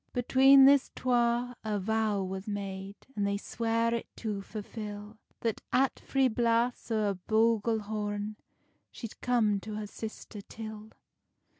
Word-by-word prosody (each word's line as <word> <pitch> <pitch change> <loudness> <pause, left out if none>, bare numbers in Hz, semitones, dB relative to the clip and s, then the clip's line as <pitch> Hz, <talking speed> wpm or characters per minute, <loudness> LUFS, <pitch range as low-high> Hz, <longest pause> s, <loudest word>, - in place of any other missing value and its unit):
Between 265 +2 +6
this 275 -1 +5
twa 245 0 +1
a 215 -1 -1
vow 215 0 0
was 190 +1 -5
made, 195 -1 -5 0.2
An 205 - -1
they 200 0 +1
sware 230 +2 0
it 235 - -2
to 210 -3 -3
fulfil; 210 0 -7 0.2
That 230 -2 -1
at 265 +1 +2
three 270 -1 +2
blasts 235 +1 +1
o 215 -3 +1
a - - -1
buglehorn, 215 0 0 0.5
She'd 230 -3 -9
come 220 -5 +2
her 215 0 -5
sister 215 0 -8
till. 215 0 -9
220 Hz, 130 wpm, -30 LUFS, 205-235 Hz, 0.5 s, Between